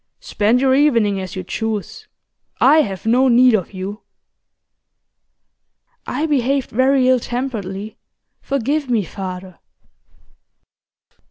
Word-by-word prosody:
'Spend 220 +4 +1
your 265 0 +2
evening 230 -9 +2
as 185 -1 -7
you 185 - -5
choose, 220 +1 -5 0.5
I 310 - +5
have 195 -7 -5
no 250 +4 +3
need 250 0 +5
of 195 -5 -1
you.' 195 +3 -7 2.1
'I 290 +5 -2
behaved 275 -3 0
very 260 +2 +2
ill 255 -1 +4
temperedly. 220 -5 -5 0.4
Forgive 275 +1 -2
me, 230 -4 +1
father. 185 0 -8
235 Hz, 105 wpm, -19 LUFS, 200-265 Hz, 2.1 s, I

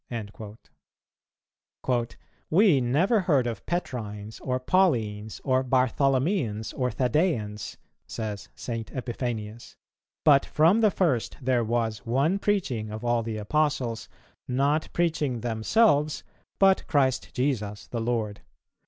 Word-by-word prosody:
"[258:3] 120 -2 0 0.3
"We 175 -5 +5
never 160 - +2
heard 150 -9 +2
of 115 -4 -4
Petrines, 110 -10 -4
or 130 -1 -2
Paulines, 115 - +1
or 130 -1 +2
Bartholomeans, 130 - +1
or 125 -1 -1
Thaddeans," 120 - -1 0.3
says 105 -3 -5
St. 115 -2 -5
Epiphanius; 120 -3 -5 0.5
"but 140 -2 +6
from 170 +9 +3
the 215 - +5
first 135 - 0
there 125 -2 +1
was 110 -2 -1
one 140 +11 +1
preaching 155 - -1
of 110 +2 -6
all 120 0 +2
the 110 -1 -4
Apostles, 120 -1 -1 0.4
not 140 +5 +1
preaching 150 -8 0
themselves, 145 - +2 0.3
but 195 -1 +4
Christ 135 -5 +1
Jesus 105 -7 -1
the 115 - -4
Lord. 110 -3 -2
125 Hz, 110 wpm, -26 LUFS, 115-150 Hz, 0.5 s, but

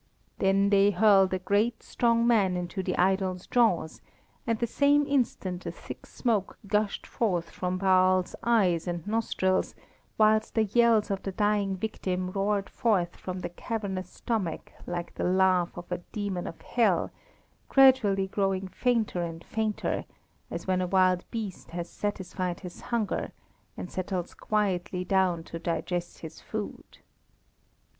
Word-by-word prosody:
Then 195 +1 +3
they 200 0 +5
hurled 195 -1 +5
a 185 - +1
great, 205 +5 0
strong 235 -1 +2
man 200 -6 +3
into 180 +2 -3
the - - -2
idol's 185 0 +1
jaws, 215 -10 +1 0.5
and 230 -1 +1
the 235 - 0
same 285 +4 +3
instant 225 -10 -1
a - - -2
thick - - -10
smoke 220 -6 -1
gushed 210 0 0
forth 180 -7 -1
from 180 0 -2
Baal's 185 -1 +3
eyes 190 -8 +2
and 175 -2 -3
nostrils, 205 -4 0 0.4
whilst 215 0 +3
the 220 - +4
yells 220 0 +3
of 195 -1 -2
the 195 - -4
dying 205 -1 +1
victim 185 -3 -3
roared 200 0 0
forth 190 -6 0
from 185 0 -6
the - - -4
cavernous 190 -1 -4
stomach 200 -9 -3 0.2
like 175 -1 -4
the - - -4
laugh 185 -1 +2
of 175 +1 -9
a 180 - -1
demon 200 -4 -3
of 165 - -8
hell, 210 -8 +1 0.6
gradually 250 -8 +5
growing 195 -1 -1
fainter 225 -3 0
and 165 -1 -5
fainter, 220 -1 -2 0.4
as - - -5
when 185 -1 +1
a 180 - -1
wild 185 -1 +3
beast 215 -5 -5
has 170 0 -5
satisfied 185 -3 -3
his 180 -2 -9
hunger, 235 -4 -2 0.5
and 180 - -6
settles 185 -1 -3
quietly 185 -3 -1
down 185 -3 +2
to 165 - -7
digest 175 +1 -3
his 160 -1 -9
food. 215 -1 -6
190 Hz, 145 wpm, -28 LUFS, 180-215 Hz, 0.6 s, they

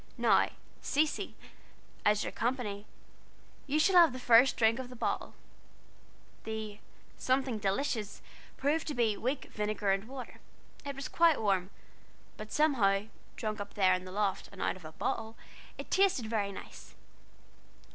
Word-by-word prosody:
Now, - - +4 0.3
Cecy, 300 +1 0 0.7
as 210 0 +3
you're - - -4
company, 225 -5 -2 0.8
you 285 +2 +1
shall 360 +4 +4
have 335 -6 +7
the 255 - -6
first 245 +1 +5
drink 225 +1 +3
out 260 - -4
of - - -13
the 250 - -10
bottle." - - -2 1.1
The 220 -1 -5 0.4
"something 260 -3 0
delicious" 210 +1 -2 0.3
proved 295 +4 0
to 300 - -3
be 225 -3 +2
weak 260 +6 -3
vinegar 210 -1 0
and 195 +3 -1
water. 260 -2 -9 0.4
It 280 -1 -5
was 275 0 -5
quite 335 -2 +4
warm, 195 -3 +1 0.7
but 215 0 -9
somehow, 220 -9 +2 0.3
drank 215 -1 -3
up 200 - -8
there 190 -2 +4
in 185 0 -2
the 185 - -8
loft, 200 -1 -1
and 200 - -13
out - - 0
of 185 -3 -13
a 155 - -8
bottle, 220 +7 -3 0.4
it - - -8
tasted 380 - +3
very 215 -3 -1
nice. - - -11
220 Hz, 155 wpm, -31 LUFS, 205-270 Hz, 1.1 s, have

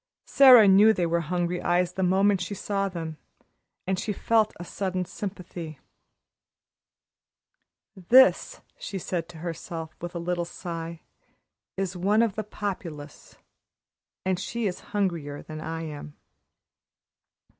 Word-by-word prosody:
Sara 255 -6 +8
knew 205 +3 +7
they 180 -4 0
were 170 0 +1
hungry 175 +2 -2
eyes 175 0 +1
the 190 - -3
moment 190 +1 +3
she 180 +3 -4
saw 195 0 -2
them, 165 -4 -6 0.7
and 190 0 -1
she 215 - -2
felt 220 +1 +2
a 175 - -6
sudden 185 0 -3
sympathy. 175 -6 -7 2.2
"This," 260 - +4 0.2
she 195 - -5
said 175 -2 -3
to 175 - -11
herself, 165 -1 -6
with 175 +1 -6
a - - -1
little 175 +1 -2
sigh, 170 -1 -7 0.8
"is 190 -1 -2
one 205 +5 +2
of 225 -4 0
the 215 - -3
Populace 175 -8 -7 0.9
and 185 -1 0
she 235 +3 -3
is 185 -3 -2
hungrier 170 -8 -2
than 155 0 -8
I 165 +1 -5
am." 150 -1 -8
180 Hz, 130 wpm, -26 LUFS, 170-200 Hz, 2.2 s, Sara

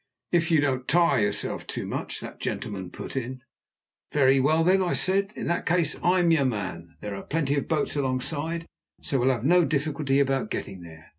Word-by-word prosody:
"If 175 0 +2
you 160 -3 +4
don't 130 -3 -1
tire 170 -3 +4
yourself 105 0 -2
too - - -4
much," - - -4
that - - -9
gentleman 95 -4 -4
put - - -8
in. 130 0 -4 0.7
"Very 135 -2 +4
well, 155 +5 +3
then," 190 +3 +4
I 180 - 0
said. 195 +1 +2
"In - - -5
that 170 - -1
case 170 -3 +2
I'm 175 -1 +3
your 160 -4 +4
man. 90 -8 -4
There 105 -1 -5
are 100 - -5
plenty 150 -3 -1
of 140 - -2
boats 155 -2 0
alongside, 145 +5 -2 0.4
so 140 -5 0
we'll 125 +2 +3
have 125 -2 0
no 175 +3 +5
difficulty 140 -2 0
about 135 -1 +1
getting 95 -2 -5
there. 80 -2 -13
140 Hz, 195 wpm, -26 LUFS, 125-165 Hz, 0.7 s, no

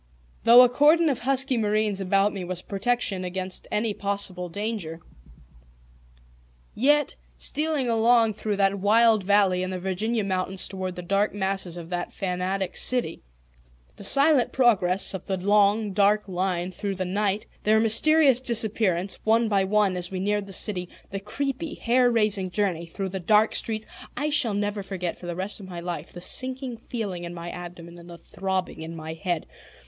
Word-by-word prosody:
Though 240 +2 +9
a - - +6
cordon 300 +6 +4
of 270 - -1
husky 265 0 +2
marines 210 -2 0
about 195 +2 +1
me 195 -3 -5
was 180 0 -2
a - - -27
protection 200 -2 -1
against 185 0 -4
any 210 0 0
possible 200 -3 -2
danger, 200 -4 -4 1.7
yet, 290 +3 +2 0.2
stealing 300 -3 -1
along 230 -1 +3
through 210 0 -3
that 195 0 +1
wild 220 +1 +4
valley 195 -2 +3
in 185 - -2
the 185 - -4
Virginia 205 +5 -2
mountains 190 0 -1
toward 185 -1 -5
the 180 - -7
dark 200 +3 0
masses 190 -3 -1
of 170 0 -9
that 175 0 -3
fanatic 185 0 -3
city, 245 -10 0 0.7
the - - -11
silent 275 +3 +3
progress 200 -8 +2
of 190 - -6
the 190 -2 -1
long, 205 +2 +2
dark 205 +1 +2
line 180 -1 -2
through 200 +1 -4
the 185 0 -3
night, 200 +2 -1 0.2
their 215 +1 +3
mysterious 265 +4 +5
disappearance, 215 -6 +2
one 225 +1 +2
by 200 -2 +1
one, 200 -1 +1
as 180 -1 -1
we 190 - -5
neared 205 +1 -1
the - - -8
city, 180 -2 +2 0.2
the 195 - -4
creepy, 275 +9 -4
hair 245 +1 +2
raising 210 -5 +1
journey 180 -4 -2
through 190 +3 -5
the 190 +1 -5
dark 210 +4 +3
streets 220 -1 0 0.3
I 295 +3 -1
shall 245 -8 +2
never 205 0 -2
forget 185 -3 -5
for 175 - -9
the 175 - -4
rest 190 +4 -4
of 190 -2 -11
my 175 -1 -7
life 170 -2 -6
the 175 - -10
sinking 255 +3 -4
feeling 210 -7 -5
in 175 0 -7
my 170 0 -7
abdomen 175 -1 -10
and 170 +1 -14
the 170 - -10
throbbing 190 0 -4
in 165 +1 -7
my 160 0 -7
head. 165 0 -3
200 Hz, 175 wpm, -25 LUFS, 185-225 Hz, 1.7 s, Though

